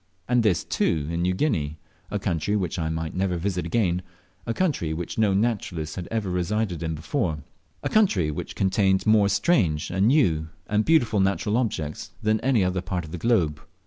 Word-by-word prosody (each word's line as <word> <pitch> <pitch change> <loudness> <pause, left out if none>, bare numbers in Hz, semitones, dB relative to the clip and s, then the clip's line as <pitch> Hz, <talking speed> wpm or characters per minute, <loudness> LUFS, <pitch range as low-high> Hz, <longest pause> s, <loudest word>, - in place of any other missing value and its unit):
And 125 0 +3
this, 100 -7 +2
too, 75 -3 0
in 85 0 -1
New 90 +1 +1
Guinea 80 - 0 0.3
a - - -1
country 85 +5 -1
which 90 -3 -1
I 80 -1 -1
might 80 0 -3
never 90 -1 0
visit 90 -1 -2
again, 90 -3 +1 0.5
a - - 0
country 140 - 0
which 85 +5 -5
no 105 -3 +3
naturalist 95 -8 -1
had 90 -2 -5
ever 110 -3 -2
resided 90 0 -1
in 80 -1 -2
before, 80 - -2 0.4
a - - 0
country 110 - +3
which - - -6
contained 95 0 +2
more 110 -2 +5
strange 100 - +1
and 95 +3 +2
new 90 - +3 0.2
and 105 +1 +1
beautiful 120 -10 +3
natural 100 +2 +1
objects 80 -12 -2
than 110 +1 +2
any 125 -5 +2
other 90 0 0
part 90 -2 -3
of 80 - -11
the 90 - -5
globe. 85 -11 +1
95 Hz, 185 wpm, -25 LUFS, 80-110 Hz, 0.5 s, more